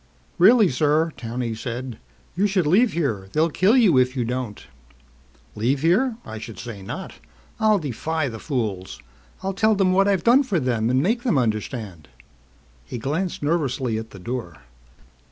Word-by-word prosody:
"Really, 215 +3 +7
sir," 155 +4 +1
Towney 120 0 -4
said, 120 +1 -6 0.4
"you 200 +4 +2
should 190 -4 +1
leave 200 +8 +3
here. 110 - -2
They'll 160 +2 +2
kill 200 - +3
you 190 - +5
if 130 +1 +1
you 120 - 0
don't!" 125 -3 -4 0.9
"Leave 125 +6 0
here? 220 +9 +3
I 110 0 -7
should 115 0 -9
say 115 -5 -8
not. 95 - -7 0.4
I'll 215 -1 +4
defy 155 - -2
the 115 -3 -6
fools. 100 - -3 0.4
I'll 195 0 -1
tell 215 +2 +3
them 195 -2 +2
what 195 +1 +4
I've 195 -3 +1
done 245 +4 +6
for 220 -11 0
them 120 -4 0
and 130 +2 +2
make 230 +6 +1
them 240 - +1
understand." 110 - -3 0.8
He - - -7
glanced 150 +9 -3
nervously 135 -7 0
at 110 0 -8
the - - -12
door. 95 -3 -6
135 Hz, 165 wpm, -23 LUFS, 115-185 Hz, 0.9 s, Really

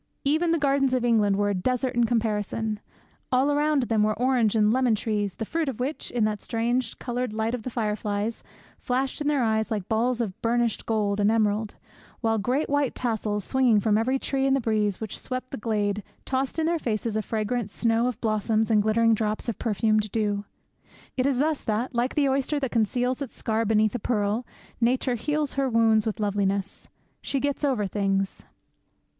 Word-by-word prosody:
'Even 315 +5 +2
the 335 - +3
gardens 275 -3 +2
of 245 -1 0
England 215 -4 +3
were 205 0 +1
a - - 0
desert 250 +7 0
in 240 -1 +3
comparison! 220 -1 -1 0.5
All 260 +3 +3
around 295 -1 +2
them 225 -3 +1
were 215 0 +1
orange 245 -3 +2
and 215 0 +4
lemon 250 -3 +3
trees, 205 -3 -2
the 220 - -4
fruit 320 +3 -1
of 245 - -6
which, 270 +5 -3
in 240 -3 0
that 210 -1 -2
strange 235 +1 -1
coloured 245 -2 -3
light 220 +1 -1
of 250 - -2
the 255 - -5
fireflies, 210 -1 -2 0.4
flashed 260 +3 -1
in 295 - -1
their 290 -4 +2
eyes 220 -1 +1
like 205 -4 -3
balls 235 +2 +1
of 210 -6 -3
burnished 235 -1 0
gold 210 -2 0
and 205 0 +4
emerald; 215 -1 +1 0.4
while 225 -2 +1
great 255 +8 0
white 285 -2 0
tassels, 215 -4 -1
swinging 255 -5 +3
from 210 +1 +2
every 245 +5 +2
tree 270 0 -1
in 270 - +3
the - - +2
breeze 215 -4 0
which 220 -3 -5
swept 255 0 -5
the - - -3
glade, 210 -2 -1 0.2
tossed 265 +2 -1
in 320 - +1
their 335 0 +1
faces 225 -3 -2
a 215 - +1
fragrant 220 +1 -2
snow 230 +2 +1
of 245 -2 -3
blossoms 220 0 +1
and 210 -1 +5
glittering 225 +2 +3
drops 215 +1 -1
of 235 - -3
perfumed 215 -1 +1
dew.' 205 -2 -1 0.7
It 255 +1 +1
is 275 -3 +1
thus 300 +2 0
that, 225 +5 -1
like 240 +2 0
the 290 -2 +3
oyster 275 +2 0
that 265 -3 -2
conceals 245 +4 0
its 275 - -5
scar 225 0 -1
beneath 215 0 +2
a 245 - -2
pearl, 215 +1 -1 0.3
Nature 250 +2 +2
heals 295 +4 -1
her 275 -1 0
wounds 225 -2 +3
with 220 +1 -2
loveliness. 200 -1 -1 0.3
She 275 - -1
gets 285 +2 -2
over 255 -8 +1
things. 195 -1 -1
230 Hz, 195 wpm, -26 LUFS, 215-255 Hz, 0.7 s, and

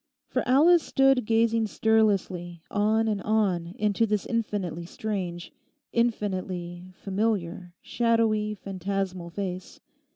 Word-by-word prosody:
For 255 - 0
Alice 320 +7 +6
stood 270 -5 +3
gazing 225 0 +2
stirlessly 195 -6 +1
on 215 +2 +2
and 210 -2 -1
on 185 -5 0
into 210 +2 +1
this 210 -1 -1
infinitely 195 -7 -2
strange, 180 -5 -4 0.4
infinitely 185 -6 -2
familiar 190 -4 -2
shadowy, 225 -3 +1
phantasmal 190 -2 -4
face. 185 0 -5
205 Hz, 100 wpm, -26 LUFS, 180-225 Hz, 0.4 s, Alice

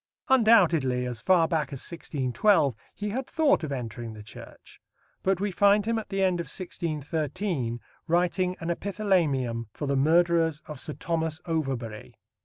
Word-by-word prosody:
Undoubtedly, 175 - +4
as 120 -2 -5
far 180 -3 +4
back 160 -3 0
as 135 - -4
1612, 145 - +1 0.2
he 210 0 -3
had 255 +5 -3
thought 305 - +2
of 150 - -3
entering 120 -3 -5
the 105 -1 -10
Church. 105 - -13 0.4
But 190 -1 +1
we 205 +1 -1
find 205 +2 +4
him 230 0 0
at 220 - -9
the 195 -1 0
end 185 -2 +2
of 170 - -3
1613 155 - -3 0.3
writing 180 +2 +1
an 170 0 -2
epithalamium 165 - 0
for 150 - -4
the 140 0 0
murderers 165 +1 +3
of 150 -3 -8
Sir 150 - -5
Thomas 160 -1 -2
Overbury. 135 -9 -3
165 Hz, 155 wpm, -27 LUFS, 135-190 Hz, 0.4 s, Undoubtedly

